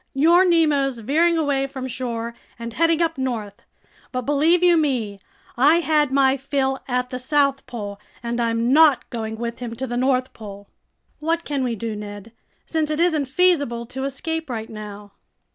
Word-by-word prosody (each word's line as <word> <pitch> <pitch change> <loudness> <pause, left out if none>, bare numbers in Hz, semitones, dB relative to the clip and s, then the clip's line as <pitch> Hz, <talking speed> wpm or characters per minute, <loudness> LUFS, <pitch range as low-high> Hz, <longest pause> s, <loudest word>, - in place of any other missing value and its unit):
Your 340 +6 +5
Nemo's 300 -7 +2
veering 320 +9 +2
away 280 -3 +1
from 265 -1 -6
shore 235 -2 -4 0.2
and 235 0 -7
heading 330 +3 +2
up 325 -4 -2
north. 225 -6 -3 0.5
But 255 -1 -3
believe 310 +6 +3
you 350 -1 +6
me, 250 -10 0 0.4
I 295 +7 +4
had 300 -4 +2
my 270 0 +3
fill 270 0 -1
at 250 -1 -1
the 255 - -4
South 275 0 +1
Pole 205 -4 -6 0.2
and 235 0 -2
I'm 230 +2 +1
not 305 -3 +5
going 220 -2 -4
with 235 0 -4
him 235 -2 -5
to 260 +3 -4
the 240 -1 -3
North 255 0 +1
Pole." 200 -2 -10 0.5
"What 330 +2 -1
can 285 -4 -2
we 240 -2 -1
do, 225 +1 -4
Ned, 205 +1 -8 0.3
since 315 -2 -1
it 305 0 -2
isn't 320 -4 +2
feasible 285 -6 +1
to 265 +1 -4
escape 320 +3 -3
right 225 -2 -5
now?" 210 -1 -9
265 Hz, 175 wpm, -22 LUFS, 235-305 Hz, 0.5 s, you